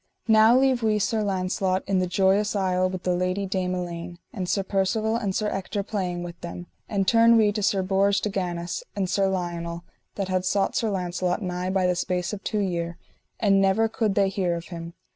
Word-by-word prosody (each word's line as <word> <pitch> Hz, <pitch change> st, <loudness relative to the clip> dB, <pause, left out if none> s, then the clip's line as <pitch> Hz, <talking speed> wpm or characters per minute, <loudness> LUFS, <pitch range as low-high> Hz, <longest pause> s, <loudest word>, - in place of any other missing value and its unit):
Now 220 Hz, +2 st, +6 dB
leave 260 Hz, -2 st, +3 dB
we 215 Hz, -1 st, +2 dB
Sir 210 Hz, +2 st, 0 dB
Launcelot 185 Hz, -1 st, 0 dB
in 195 Hz, -1 st, +1 dB
the 185 Hz, -, 0 dB
Joyous 195 Hz, +3 st, +2 dB
Isle 185 Hz, -2 st, +1 dB
with 185 Hz, -1 st, -6 dB
the 180 Hz, -, +1 dB
Lady 185 Hz, +2 st, -1 dB
Dame 185 Hz, -1 st, -1 dB
Elaine, 175 Hz, -1 st, -5 dB, 0.2 s
and 185 Hz, -6 st, -4 dB
Sir 195 Hz, 0 st, +1 dB
Percivale 210 Hz, +3 st, 0 dB
and 200 Hz, -5 st, -2 dB
Sir 215 Hz, -, 0 dB
Ector 200 Hz, +1 st, -3 dB
playing 185 Hz, -4 st, -3 dB
with 175 Hz, 0 st, -9 dB
them, 175 Hz, +1 st, -7 dB, 0.2 s
and 195 Hz, -2 st, 0 dB
turn 230 Hz, 0 st, +6 dB
we 215 Hz, -2 st, +4 dB
to 210 Hz, +1 st, -3 dB
Sir 195 Hz, -1 st, +1 dB
Bors 195 Hz, +1 st, +2 dB
de 210 Hz, -, -2 dB
Ganis 175 Hz, -2 st, -3 dB
and 195 Hz, -2 st, 0 dB
Sir 195 Hz, +1 st, +1 dB
Lionel, 170 Hz, -2 st, -3 dB, 0.3 s
that 195 Hz, -2 st, -2 dB
had 185 Hz, -1 st, 0 dB
sought 195 Hz, +1 st, 0 dB
Sir 225 Hz, -, +1 dB
Launcelot 180 Hz, 0 st, -1 dB
nigh 180 Hz, 0 st, -2 dB
by 190 Hz, -1 st, +1 dB
the 180 Hz, -, +3 dB
space 180 Hz, +1 st, -2 dB
of 200 Hz, -, -6 dB
two 210 Hz, -2 st, -1 dB
year, 170 Hz, -3 st, -2 dB, 0.4 s
and 195 Hz, -2 st, +4 dB
never 195 Hz, +3 st, +3 dB
could 220 Hz, -2 st, -1 dB
they 195 Hz, -1 st, +3 dB
hear 185 Hz, -3 st, -1 dB
of 170 Hz, 0 st, -7 dB
him. 170 Hz, -1 st, -7 dB
190 Hz, 210 wpm, -25 LUFS, 180-205 Hz, 0.4 s, Now